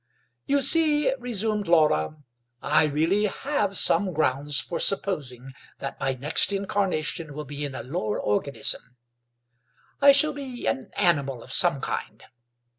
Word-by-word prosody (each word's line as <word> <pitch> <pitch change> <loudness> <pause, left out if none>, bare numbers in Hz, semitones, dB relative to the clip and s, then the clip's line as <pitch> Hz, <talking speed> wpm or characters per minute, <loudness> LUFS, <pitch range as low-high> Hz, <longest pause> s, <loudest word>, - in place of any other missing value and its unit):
"You 280 0 +2
see," 300 -3 +3
resumed 220 -4 -1
Laura, 155 - +2 0.4
"I - - +2
really 165 +8 +1
have 210 -3 -2
some 185 +2 +3
grounds 145 -1 0
for 150 +6 -4
supposing 135 -10 -2 0.2
that 135 - -7
my 135 -1 -1
next 145 +9 +2
incarnation 185 -6 -2
will 150 0 -6
be 145 +1 -6
in 140 -2 -6
a - - -6
lower 120 -6 -3
organism. 125 +2 -3 1.0
I 280 0 +8
shall 300 +2 +3
be 265 -4 -7
an 260 -6 -2
animal 140 -8 +1
of - - -7
some - - +4
kind. - - -5
170 Hz, 135 wpm, -25 LUFS, 140-220 Hz, 1.0 s, I